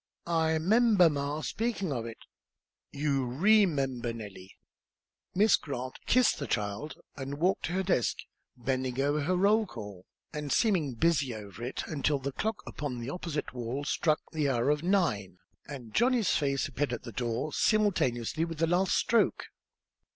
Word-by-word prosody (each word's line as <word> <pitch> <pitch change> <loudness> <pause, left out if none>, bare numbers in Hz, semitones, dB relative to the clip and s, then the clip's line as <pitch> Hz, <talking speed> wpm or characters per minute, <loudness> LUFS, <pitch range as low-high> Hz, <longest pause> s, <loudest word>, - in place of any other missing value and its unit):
I 160 -1 +1
'member 200 0 +4
ma 145 +1 -2
speakin' 215 -3 -2
of 115 -4 -3
it." 115 - -8 0.7
"You 140 -2 0
remember, 140 - +2
Nellie." 100 -4 -10 0.8
Miss 210 +3 +5
Grant 130 -3 -6
kissed 250 -6 +4
the 140 - -4
child 105 +9 -2 0.2
and 140 0 -5
walked 180 +5 +1
to 175 - -3
her 190 +1 0
desk, 175 - +1 0.4
bending 130 +1 -2
over 145 +2 +1
her 180 +6 +1
roll 205 +4 +3
call, 105 - -9 0.3
and 150 -2 -4
seeming 175 - +2
busy 140 -3 +1
over 105 +1 -9
it 125 - -3
until 145 -1 0
the 140 +1 -4
clock 220 +10 -3
upon 145 -4 -5
the 120 +3 -4
opposite 165 -6 -4
wall 125 +3 -4
struck 155 +2 +1
the 150 -3 0
hour 125 +2 +2
of 150 0 0
nine, 155 - 0 0.3
and 130 -6 -9
Johnny's 240 -3 +3
face 140 -2 +1
appeared 145 -3 -2
at 120 - -5
the 120 - -7
door, 120 +5 -2
simultaneously 160 - +1
with 165 -1 -4
the 165 - +2
last 180 +3 +2
stroke. 235 - +1
145 Hz, 160 wpm, -30 LUFS, 125-175 Hz, 0.8 s, Miss